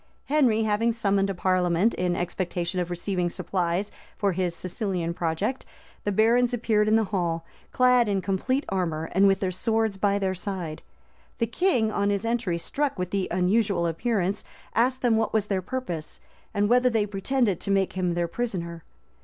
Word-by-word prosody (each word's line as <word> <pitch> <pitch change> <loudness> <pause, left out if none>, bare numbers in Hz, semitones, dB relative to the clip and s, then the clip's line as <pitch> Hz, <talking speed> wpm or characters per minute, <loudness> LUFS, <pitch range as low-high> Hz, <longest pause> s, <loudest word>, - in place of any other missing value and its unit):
Henry 255 -7 +3
having 220 +2 +2
summoned 200 -3 +1
a 195 - -2
parliament, 180 +3 +2
in 180 -1 0
expectation 175 0 -2
of 175 -1 -2
receiving 175 0 -1
supplies 180 +2 -2 0.3
for 200 -2 +1
his 180 -1 -1
Sicilian 180 -2 -2
project, 175 +10 -2 0.4
the 205 - +1
barons 235 +4 +3
appeared 215 -2 +1
in 215 - +4
the 225 - +4
hall, 165 -3 -1 0.3
clad 250 -2 +4
in 200 -2 +1
complete 205 +9 -1
armor, 165 -4 -2
and 195 +2 +4
with 195 +1 +2
their 185 -2 0
swords 220 +1 0
by 200 0 +2
their 190 -2 0
side: 180 -4 -4 0.6
the 230 - +1
king, 235 - +1
on 200 -1 +1
his 200 +1 -1
entry, 230 -7 0
struck 280 - -1
with 180 -1 -3
the 195 -2 0
unusual 185 0 +1
appearance, 195 +3 -1 0.3
asked 255 +3 +1
them 235 -3 +4
what 225 -1 0
was 215 -2 +2
their 195 -3 -1
purpose, 185 -8 -5 0.3
and 205 0 +1
whether 250 +2 +4
they 225 -3 +1
pretended 205 0 0
to - - -4
make 195 -1 +2
him 180 -2 -1
their 175 0 0
prisoner. 170 -5 -4
195 Hz, 175 wpm, -26 LUFS, 180-225 Hz, 0.6 s, in